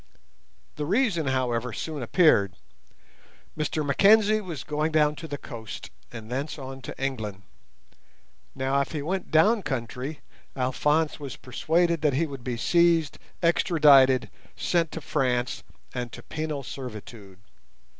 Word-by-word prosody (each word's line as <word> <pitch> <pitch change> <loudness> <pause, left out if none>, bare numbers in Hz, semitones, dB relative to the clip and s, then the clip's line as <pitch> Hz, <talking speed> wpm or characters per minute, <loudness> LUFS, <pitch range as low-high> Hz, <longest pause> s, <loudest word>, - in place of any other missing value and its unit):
The 150 - -2
reason, 200 - +1
however, 125 -2 0
soon 150 +6 -5
appeared. 120 - +3 1.0
Mr 155 0 -2
Mackenzie 215 +8 +5
was 170 -9 -6
going 150 +1 -1
down 150 -1 +3
to 165 - -7
the 145 -1 -4
coast, 115 -7 -8 0.2
and 115 0 -9
thence 140 +5 -3
on 135 -1 -8
to - - -8
England. 110 -8 -3 1.1
Now, 135 +1 +1
if 140 - -4
he 150 -3 -3
went 185 +5 -3
down 210 +8 +4
country, 130 - -4 0.3
Alphonse 150 +5 +1
was 140 -2 -6
persuaded 170 +6 0
that 150 -3 +2
he 155 +6 +1
would 135 -5 -8
be 125 -1 -3
seized, 170 +2 +2 0.2
extradited, 145 -7 +5 0.2
sent 170 -3 0
to - - -5
France, 125 -4 -1 0.3
and 125 -2 -4
to - - -9
penal 155 -3 -4
servitude. 110 -6 -9
145 Hz, 135 wpm, -26 LUFS, 125-160 Hz, 1.1 s, Mackenzie